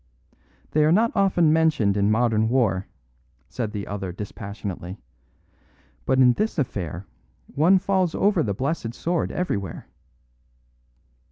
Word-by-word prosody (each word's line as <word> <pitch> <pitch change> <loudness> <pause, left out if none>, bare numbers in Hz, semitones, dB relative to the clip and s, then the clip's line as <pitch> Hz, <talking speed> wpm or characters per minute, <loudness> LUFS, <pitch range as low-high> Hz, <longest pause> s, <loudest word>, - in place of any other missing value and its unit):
"They 155 - +3
are 155 - +4
not 225 +6 +3
often 180 -6 +3
mentioned 155 -11 +2
in 100 0 +2
modern 110 -1 +2
war," 110 -7 +1 0.6
said 115 -4 -4
the 105 -2 -5
other 100 -2 -5
dispassionately; 100 -1 -7 1.1
"but 130 - +2
in 125 -2 +6
this 215 - -2
affair 95 - -3 0.5
one 170 +7 +4
falls 185 -3 0
over 200 -4 +2
the 100 -8 -1
blessed 130 -1 -3
sword 170 0 -1
everywhere." 100 - -3
120 Hz, 120 wpm, -24 LUFS, 100-165 Hz, 1.1 s, in